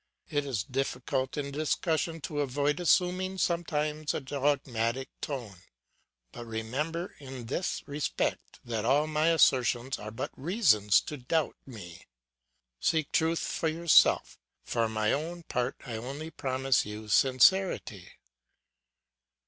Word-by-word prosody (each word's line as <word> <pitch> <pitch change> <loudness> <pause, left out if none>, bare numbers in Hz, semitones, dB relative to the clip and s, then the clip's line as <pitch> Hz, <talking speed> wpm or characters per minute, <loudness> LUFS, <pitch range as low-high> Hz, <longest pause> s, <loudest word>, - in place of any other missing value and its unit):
It 145 -1 0
is 115 -8 -1
difficult 130 +2 -2
in 140 -1 -3
discussion 160 +2 -1
to 145 +1 -4
avoid 145 +3 0
assuming 185 +2 +2
sometimes 155 -4 -1
a - - 0
dogmatic 135 -3 -1
tone; 120 -10 -5 0.7
but 120 - -8
remember 135 +10 -3
in 130 -3 -8
this 140 +10 -2
respect 145 0 -3
that 115 -3 -2
all 140 +6 +3
my 155 +1 +1
assertions 130 -5 +3
are 105 - -6
but 110 - -5
reasons 130 - +3
to 150 - -6
doubt 150 +5 -1
me. 90 -9 -11 0.7
Seek 160 -3 0
truth 165 +1 +2
for 165 - -2
yourself, 165 +1 +4 0.2
for 115 -1 0
my 110 -1 +1
own 170 +4 -3
part 125 -4 -2
I 115 -4 -4
only 140 +7 -6
promise 130 -2 +1
you 105 +1 -8
sincerity. 130 - +3
140 Hz, 125 wpm, -29 LUFS, 120-160 Hz, 0.7 s, yourself